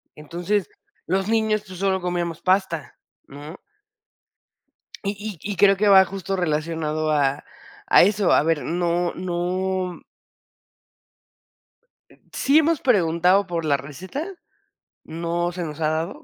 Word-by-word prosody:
Entonces, 175 +6 -2 0.4
los 190 +2 0
niños, 220 -1 +1
pues, 185 -1 -10
solo 190 -1 +1
comíamos 175 -2 -3
pasta, 185 -7 0 0.3
¿no? 145 +5 -10 1.5
Y 200 -2 -5
y 205 - -3
y - - -8
creo 195 +1 +5
que 210 +1 +2
va 190 -1 +8
justo 195 0 -4
relacionado 155 -2 -1
a 140 -2 +1 0.4
a - - +7
eso. 205 0 +2
A - - +4
ver, 160 -1 0
no 175 0 -1
no 180 +1 -3 2.3
Sí 285 +4 +4
hemos 320 -1 +1
preguntado 185 -3 +3
por 170 -2 -3
la 145 -2 +2
receta, 175 - -7 0.8
no 170 +2 -2
se 175 0 -4
nos 155 -1 -7
ha 155 - +1
dado, 165 - -3
175 Hz, 125 wpm, -23 LUFS, 165-195 Hz, 2.3 s, va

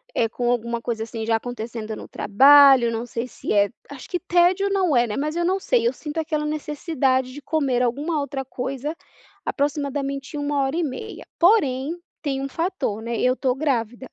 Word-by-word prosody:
eh, 225 - +2
com 240 0 -2
alguma 235 -1 -1
coisa, 225 -2 -3
assim, 225 -1 -5
já 225 0 +2
acontecendo 225 -2 -5
no - - -9
trabalho. 270 +2 +6
Não 230 +1 -3
sei 240 +1 -4
se - - -6
é 205 0 +4 0.2
Acho 280 -3 -10
que 355 - -1
tédio 360 +2 +3
não 370 -7 +2
é, 240 0 +4
né. 210 - -4
Mas 305 +3 -2
eu 345 - 0
não 380 +2 +1
sei. 470 +3 +2
Eu - - +1
sinto 300 +1 -7
aquela 305 -1 -1
necessidade 290 -4 -1
de 290 - -9
comer 275 -6 0
alguma 290 +6 -1
outra 280 -2 -4
coisa 270 +4 -4 0.5
aproximadamente 280 0 -2
1 290 -1 0
hora 270 +4 -1
e 345 - +1
meia. 315 +10 -6
Porém, 320 - +3 0.2
tem 270 -3 -2
um 275 - -2
fator, 330 - -2
né. 230 0 -3
Eu 255 0 +2
tô 255 -1 0
grávida. 255 -4 -2
275 Hz, 190 wpm, -23 LUFS, 245-310 Hz, 0.5 s, trabalho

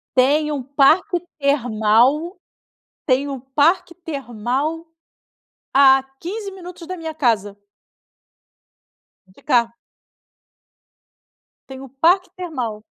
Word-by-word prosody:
Tem 290 +4 +3
um 285 -2 -3
parque 285 +7 +2 0.2
termal 260 - +2 0.7
tem 275 0 +1
um 275 -1 -5
parque 290 +7 +1
termal 280 0 -4 0.9
a 270 -1 +6 0.2
15 395 +3 -6
minutos 360 -2 -11
da 370 +2 -6
minha 325 -2 -6
casa. 225 -9 0 1.7
De 185 - -22
cá. 235 -4 +2 2.0
Tem 265 -1 -9
um 270 - -9
parque 345 +8 +2
termal. 255 -12 -5
280 Hz, 95 wpm, -20 LUFS, 250-330 Hz, 2.0 s, a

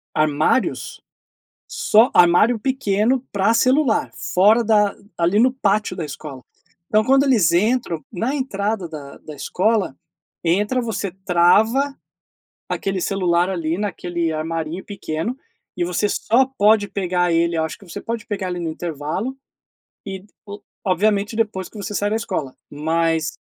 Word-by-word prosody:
Armários? 155 - 0 0.7
Só 280 - +3
armário 210 +7 +5
pequeno 255 0 0
pra 200 +2 +2
celular 255 +1 +2
fora 210 +6 +3
da 210 -2 +3 0.2
ali 175 +5 +3
no 255 +2 +4
pátio 205 -6 0
da 170 - -3
escola. 145 -2 -8 0.5
Então 215 0 +3
quando 270 +4 +4
eles 225 - +4
entram, 205 -2 +1
na 230 +9 -2
entrada 210 -7 -2
da 145 -3 -9
da 155 - -10
escola, 185 - 0 0.5
entra, 205 +9 +1
você 210 -5 -3
trava 220 +11 +3 0.7
aquele 195 -1 -2
celular 180 -2 +1
ali 170 -3 -2
naquele 175 -5 -2
armarinho 165 +2 -3
pequeno, 200 +4 -4 0.4
e 175 - 0
você 180 +4 0
só 255 +4 +2
pode 205 0 +4
pegar 180 -2 0
ele 170 +1 +2
acho 160 -1 -2
que 200 - -17
você 165 - -7
pode 230 -1 -4
pegar, 200 -3 -3
ali, 180 -1 -3
no 165 -1 -3
intervalo 170 - -4 0.7
e 190 0 -6 0.2
o 205 +1 -8 0.3
obviamente 205 +3 +1
depois 205 -5 -1
que - - -16
você 205 0 -5
sai 205 +1 0
da 220 - +1
escola 185 - -4
mas 160 +1 0
195 Hz, 140 wpm, -21 LUFS, 170-225 Hz, 0.7 s, armário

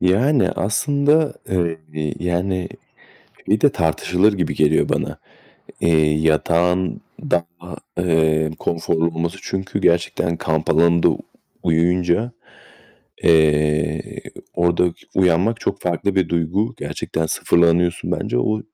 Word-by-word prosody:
Yani, 120 +10 +2
aslında, 145 +8 +1
eee, 80 -4 -3
yani, 90 +1 -1 0.8
bir 105 +2 +2
de 145 - +6
tartışılır 90 +4 +1
gibi 90 -7 -2
geliyor 75 +1 +2
bana. - - -2 0.6
Eee, 80 -2 +3
yatağın 85 +3 +1 0.2
daha, 85 +1 -3 0.2
eee, 80 -3 +2
konforlu 80 -1 -1
olması 85 0 -3
çünkü 95 +1 -4
gerçekten 85 -1 +1
kamp 80 -1 -1
alanında 85 +2 +4 0.5
uyuyunca, 90 +7 +1 0.9
eee, 75 -1 +2 0.3
orada 85 0 +2 0.2
uyanmak 95 +5 +2
çok 100 - -2
farklı 90 +3 -1
bir 95 -3 +1
duygu. 85 +6 -1
Gerçekten 80 0 -3
sıfırlanıyorsun 85 +2 +1
bence. - - -1
O, 110 +12 0
85 Hz, 100 wpm, -20 LUFS, 80-95 Hz, 0.9 s, de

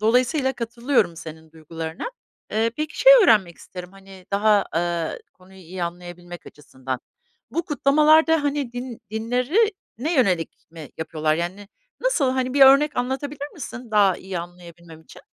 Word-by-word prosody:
dolayısıyla 255 +5 +2
katılıyorum 235 -5 -1
senin 160 0 -10
duygularına. 160 +1 -7 0.5
Eee, 225 +2 +1
peki, 305 0 -4
şey - - +8
öğrenmek 200 - +3
isterim, 180 0 -10
hani, 195 -1 -15
daha, 205 0 +3
ııı, 170 -1 -1 0.2
konuyu 185 +1 -18
iyi 180 0 -8
anlayabilmek 175 0 -9
açısından. 130 -3 -7 0.5
Bu 335 - -2
kutlamalarda, 310 +2 +4
hani, 285 -4 -2
din 245 -1 -7
dinlerine 255 - -1
yönelik 185 - 0
mi 160 -3 -10
yapıyorlar? 155 -1 -1
Yani, 185 +5 -5 0.3
nasıl, 410 - +1
hani, 260 0 -2
bir 285 - +1
örnek 280 +3 +6
anlatabilir 280 +3 -3
misin 250 -5 -8
daha 200 -3 +4
iyi 190 -2 -6
anlayabilmem 170 -1 -11
için? - - -16
210 Hz, 135 wpm, -23 LUFS, 175-270 Hz, 0.5 s, şey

